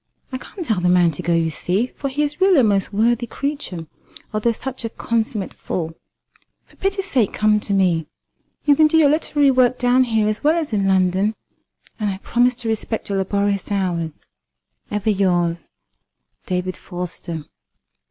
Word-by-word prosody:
I 255 - -4
can't 355 +6 -8
tell 220 -9 0
the 180 - +2
man 175 -2 +4
to 145 - -6
go, 175 - -1
you 165 -1 +1
see, 195 +10 -1
for 280 - -3
he 290 +3 0
is 295 +4 -3
really 375 -7 +6
a - - +2
most 200 -3 +2
worthy 235 +3 +1
creature, 280 - -4 0.5
although 215 +2 +1
such 255 +2 -5
a 230 - -2
consummate 225 -3 -2
fool. 165 -2 -4 0.7
For - - -24
pity's 390 0 -1
sake 250 - +1
come 215 0 +3
to 205 - -4
me. 180 -5 +2 0.6
You 290 -1 +5
can 310 +1 +6
do 320 - +2
your 305 -3 +6
literary 295 -2 +3
work 255 -1 +3
down 250 +1 +3
here 220 -3 +1
as 215 +4 -2
well 310 +3 +4
as 305 -8 -4
in 200 -2 +1
London, 190 +3 +2 0.6
and 210 -1 0
I 190 - -3
promise 245 +5 +2
to 235 -1 -6
respect 220 0 -2
your 195 -1 0
laborious 200 +1 -1
hours. 180 -5 0 0.8
Ever 210 +1 0
yours, 175 -4 0 0.8
"DAVID 180 0 -2
FORSTER." 175 -3 -6
215 Hz, 175 wpm, -21 LUFS, 185-255 Hz, 0.8 s, really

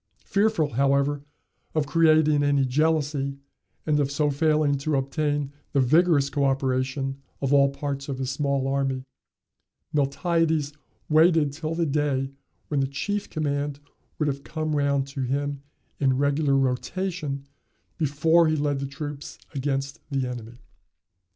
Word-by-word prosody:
Fearful, 200 - +1
however, 140 +2 +2 0.5
of 155 -2 +2
creating 155 -1 +4
any 140 -1 +3
jealousy, 145 0 0 0.5
and 150 -1 +2
of 140 -2 +1
so 145 +1 +1
failing 150 0 +2
to 150 +2 0
obtain 145 +1 -1 0.2
the 140 - +3
vigorous 145 +1 +4
coöperation 135 -1 0 0.2
of 135 0 0
all 140 -1 +6
parts 140 0 -4
of 135 - -3
his 130 0 -2
small 140 -1 0
army, 135 -1 0 0.9
Miltiades 155 +1 +1 0.3
waited 155 -2 +4
till 155 +2 -4
the 170 0 +1
day 140 -2 0 0.4
when 145 - 0
the 135 - +1
chief 205 +9 -3
command 145 -2 -2 0.4
would 155 - 0
have 140 -1 -2
come 155 0 -2
round 140 -1 +1
to 140 0 -5
him 140 +2 -2 0.4
in 130 -2 +2
regular 140 0 +2
rotation 140 +2 -2 0.5
before 160 +3 +3
he 155 - +2
led 145 -2 0
the 140 - -3
troops 145 0 -7 0.2
against 135 +1 -2
the 135 -2 0
enemy. 120 -1 -7
145 Hz, 135 wpm, -25 LUFS, 135-155 Hz, 0.9 s, all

